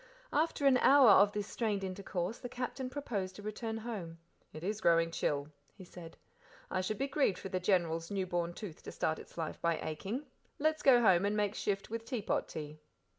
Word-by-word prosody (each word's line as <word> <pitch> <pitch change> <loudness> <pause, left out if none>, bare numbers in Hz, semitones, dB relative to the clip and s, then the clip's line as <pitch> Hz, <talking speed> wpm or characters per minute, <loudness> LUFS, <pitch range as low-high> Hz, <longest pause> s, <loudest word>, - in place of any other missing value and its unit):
After 305 -1 +1
an 270 -2 +6
hour 270 -5 +7
of 200 +1 +6
this 205 -1 -3
strained 210 -3 -2
intercourse 185 +1 -3
the 245 - -6
Captain 255 +1 -4
proposed 205 -10 -4
a 205 - -10
return 220 +1 -4
home. 210 -8 -6 0.3
"It 155 - -9
is 210 +3 -2
growing 165 -2 +4
chill," 145 -2 -1 0.3
he 190 - -11
said. 175 -2 -11 0.5
"I 185 - 0
should 205 +3 -2
be 275 - 0
grieved 275 -8 +1
for 190 - -7
the 185 - -1
General's 170 -3 +1
new 195 -2 -1
born 175 -1 -2
tooth 200 -8 -8
to - - -8
start 160 0 -1
its - - -14
life 160 -2 -4
by 170 -1 +1
aching 195 - -4 0.3
let's 310 +1 +1
go 250 -3 +6
home 190 -4 +5
and 205 +1 +1
make 205 -1 +1
shift 200 -1 -2
with 230 0 -3
teapot 230 -3 -2
tea." 150 0 -7
200 Hz, 200 wpm, -33 LUFS, 175-230 Hz, 0.5 s, hour